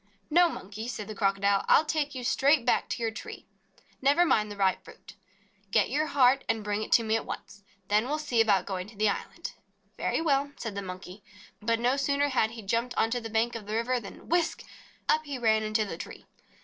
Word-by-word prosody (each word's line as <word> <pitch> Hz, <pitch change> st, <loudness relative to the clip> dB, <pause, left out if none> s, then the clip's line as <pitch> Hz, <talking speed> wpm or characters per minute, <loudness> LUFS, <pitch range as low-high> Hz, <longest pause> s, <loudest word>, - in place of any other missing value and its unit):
"No, 345 Hz, +2 st, +6 dB
Monkey," 215 Hz, -3 st, -7 dB
said 215 Hz, -4 st, -5 dB
the 215 Hz, -, -5 dB
Crocodile, 200 Hz, -1 st, +2 dB
"I -, -, +7 dB
'11 310 Hz, -, +3 dB
take 295 Hz, -3 st, -1 dB
you 255 Hz, -, -5 dB
straight 275 Hz, +1 st, +3 dB
back 245 Hz, -, +2 dB
to 235 Hz, -, -3 dB
your 225 Hz, -, 0 dB
tree. 220 Hz, -, -9 dB, 0.6 s
Never 285 Hz, +6 st, +4 dB
mind 210 Hz, -9 st, +2 dB
the 205 Hz, -, -8 dB
ripe 190 Hz, -2 st, +1 dB
fruit. -, -, -14 dB, 0.6 s
Get 205 Hz, +2 st, +2 dB
your 305 Hz, +3 st, +1 dB
heart 270 Hz, -1 st, +4 dB
and 225 Hz, -1 st, 0 dB
bring 205 Hz, 0 st, -1 dB
it -, -, -5 dB
to 230 Hz, -, +6 dB
me 220 Hz, 0 st, +1 dB
at 225 Hz, -, -1 dB
once. 205 Hz, -, -8 dB, 0.3 s
Then 210 Hz, +3 st, +3 dB
we -, -, -5 dB
'11 305 Hz, +2 st, -2 dB
see 235 Hz, -5 st, +3 dB
about 200 Hz, -5 st, +3 dB
going 185 Hz, -1 st, -4 dB
to 215 Hz, -, -14 dB
the 210 Hz, +1 st, +2 dB
island." -, -, -5 dB, 0.5 s
"Very -, -, 0 dB
well," 285 Hz, -3 st, +1 dB
said 225 Hz, -3 st, -5 dB
the 200 Hz, -, -4 dB
Monkey. 185 Hz, +1 st, -8 dB, 0.4 s
But 230 Hz, +1 st, +1 dB
no 250 Hz, +3 st, +2 dB
sooner 280 Hz, +1 st, +1 dB
had 245 Hz, -5 st, +2 dB
he 225 Hz, -1 st, -9 dB
jumped 230 Hz, +5 st, -1 dB
onto 225 Hz, +2 st, +1 dB
the 225 Hz, -1 st, -7 dB
bank 225 Hz, +2 st, +1 dB
of 220 Hz, -3 st, -7 dB
the 215 Hz, -, -2 dB
river 245 Hz, +2 st, 0 dB
than 200 Hz, -4 st, -11 dB
whisk! 340 Hz, 0 st, 0 dB, 0.4 s
up 310 Hz, -, +3 dB
he 285 Hz, -2 st, -4 dB
ran 220 Hz, -3 st, +3 dB
into 215 Hz, 0 st, 0 dB
the 180 Hz, -5 st, -6 dB
tree. -, -, -9 dB
225 Hz, 225 wpm, -28 LUFS, 210-275 Hz, 0.6 s, I